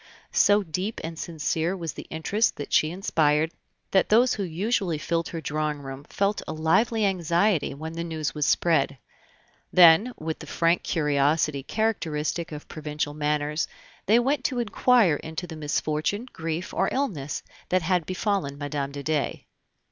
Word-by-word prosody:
So 205 0 +5
deep 185 +6 -3
and 165 0 -5
sincere 165 +2 -1
was 165 -5 -4
the - - -9
interest 205 +8 0
that 145 - -7
she 155 - +4
inspired, 160 -3 +1 0.4
that 190 - +3
those 240 +4 +5
who 205 - -3
usually 185 0 -1
filled 165 +2 -1
her 165 - -5
drawing 150 0 -1
room 135 +1 -8
felt 200 +4 0
a - - -3
lively 210 +8 +2
anxiety 175 -3 +1
when 160 +3 -6
the 165 0 -3
news 160 -3 -3
was 150 -2 0
spread; 140 -5 +2 0.7
then, 180 +7 +7
with 160 0 -4
the - - -9
frank 170 +1 +2
curiosity 150 -1 +1
characteristic 165 -4 -1
of 150 -1 -8
provincial 150 -1 -4
manners, 150 +1 -1 0.4
they 220 +4 +6
went 270 +5 +1
to 255 - 0
inquire 230 - +3
into 160 +4 -6
the 165 -2 -8
misfortune, 155 +7 -1
grief, 165 +2 -4
or 195 - +1
illness 160 - -2 0.3
that 185 -1 +2
had 180 -1 +1
befallen 185 -6 -1
Mme. 145 -1 -3
de 140 0 -7
Dey. 155 -2 -1
160 Hz, 155 wpm, -26 LUFS, 150-195 Hz, 0.7 s, then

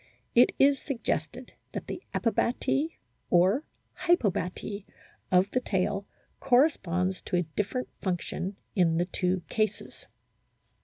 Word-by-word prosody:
It 245 +1 +5
is 275 0 +5
suggested 265 -5 -3 0.2
that - - -4
the - - -6
"epibaty" 245 +7 0 0.3
or 190 - +4 0.2
" - - -28
hypobaty 205 - +1 0.2
" - - -33
of 185 +2 +4
the 255 - +2
tail 195 -2 -1 0.3
corresponds 190 - +2
to - - -3
a 175 - +3
different 225 +5 -1
function 185 +1 -2 0.2
in 170 -4 +3
the 175 - +2
two 180 0 -1
cases. 215 -1 -2
200 Hz, 120 wpm, -28 LUFS, 180-250 Hz, 0.3 s, It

